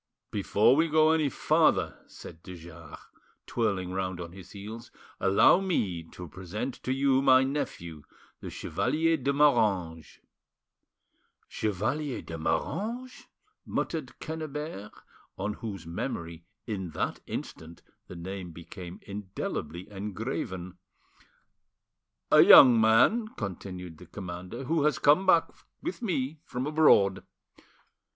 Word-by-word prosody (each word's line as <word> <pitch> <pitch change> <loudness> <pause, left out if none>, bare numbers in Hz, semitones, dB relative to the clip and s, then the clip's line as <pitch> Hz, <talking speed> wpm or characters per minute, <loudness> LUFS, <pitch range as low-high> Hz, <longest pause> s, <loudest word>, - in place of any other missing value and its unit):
"Before 105 +4 +3
we 160 +3 +3
go 155 0 +4
any 155 -3 +2
farther," - - +2
said 80 - -12
de 90 0 -9
Jars, 85 -2 -11 0.5
twirling 100 -6 -1
round 95 -1 -3
on 85 -1 -7
his 95 -1 -12
heels, 110 +4 -9 0.3
"allow 100 - +5
me 105 - -1
to 90 +2 -10
present 95 - -6
to 130 - -3
you 135 0 +2
my 130 -1 +6
nephew, 85 - -4 0.4
the - - -7
Chevalier 160 +6 0
de 140 -2 -1
Moranges." 105 - +1 1.3
"Chevalier 120 +8 -2
de 80 - -7
Moranges!" 215 - -3 0.4
muttered - - -4
Quennebert, 150 -8 -6 0.5
on 100 +2 -2
whose 100 -7 -6
memory 85 -2 -5 0.2
in 95 -6 -4
that - - -2
instant 80 +1 -7 0.2
the - - -10
name 90 +1 -6
became 85 +2 -10
indelibly 95 -4 -5
engraven. 95 -3 -5 1.5
"A - - +8
young 120 -4 +9
man," 120 - +4
continued 90 -4 -6
the 90 - -13
commander, 90 +5 -7
"who 155 +2 0
has 150 - +2
come 150 +7 +4
back 170 -3 +4 0.3
with 345 -4 -4
me 155 - -2
from 125 -3 -4
abroad. 140 -11 +4
105 Hz, 115 wpm, -28 LUFS, 90-140 Hz, 1.5 s, young